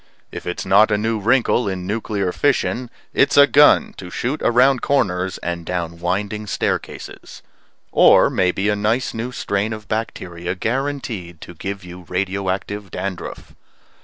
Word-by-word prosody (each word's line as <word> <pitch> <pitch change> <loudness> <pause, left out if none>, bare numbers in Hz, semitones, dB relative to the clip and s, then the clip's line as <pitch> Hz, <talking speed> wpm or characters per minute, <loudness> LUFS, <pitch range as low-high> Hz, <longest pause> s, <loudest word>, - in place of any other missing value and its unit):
If - - -8
it's 90 - -3
not 105 +3 +5
a 105 - +2
new 110 +1 -1
wrinkle 120 0 +2
in 90 -1 -4
nuclear 100 -2 -2
fission, 130 0 0 0.2
it's 140 - +3
a 140 - +10
gun 145 +1 +5
to 90 - -8
shoot 130 +10 -3
around 125 +2 +4
corners 95 -9 0
and 85 -1 -3
down 85 -1 -4
winding 105 +4 -2
staircases. - - -4 0.5
Or - - +6
maybe 95 +2 +1
a 105 - +2
nice 110 +5 0
new 115 +3 -4
strain 100 -2 -2
of 110 -1 -9
bacteria 90 -5 -4
guaranteed 115 - -3
to - - -9
give 95 +3 -6
you 90 0 -10
radio 95 +1 -2
active 100 +1 -4
dandruff. 95 +1 -6
100 Hz, 150 wpm, -20 LUFS, 90-115 Hz, 0.5 s, a